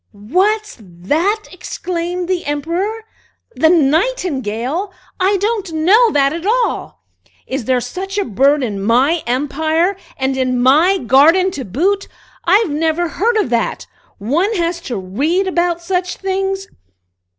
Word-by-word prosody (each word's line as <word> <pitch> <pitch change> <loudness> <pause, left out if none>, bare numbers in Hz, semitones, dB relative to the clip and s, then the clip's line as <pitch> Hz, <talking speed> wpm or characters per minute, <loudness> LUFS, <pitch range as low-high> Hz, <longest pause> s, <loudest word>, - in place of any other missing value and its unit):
"What's 380 - 0
that?" 295 - -1
exclaimed 355 -1 -4
the 360 -3 -2
Emperor. 345 +10 -2 0.5
"The 320 - +4
Nightingale? 320 - 0 0.3
I 385 +2 +2
don't 405 -2 -2
know 395 +10 +4
that 275 0 +2
at 335 0 -5
all! 465 +4 -1 0.4
Is 260 -3 -4
there 255 0 +2
such 375 - -5
a 405 - +1
bird 275 +6 +2
in 205 -5 -3
my 260 - +2
empire, 315 +8 0 0.2
and 265 0 -1
in 255 -1 0
my 310 +10 +4
garden 325 +8 +4
to 280 - -5
boot? 365 - 0 0.4
I've 390 0 +3
never 325 +3 0
heard 445 +8 0
of 405 - 0
that. 235 -1 -1 0.3
One 305 - 0
has 340 -1 -1
to 240 - -2
read 280 - -1
about 345 -2 0
such 360 0 -2
things." 385 0 -2
335 Hz, 135 wpm, -17 LUFS, 265-385 Hz, 0.5 s, The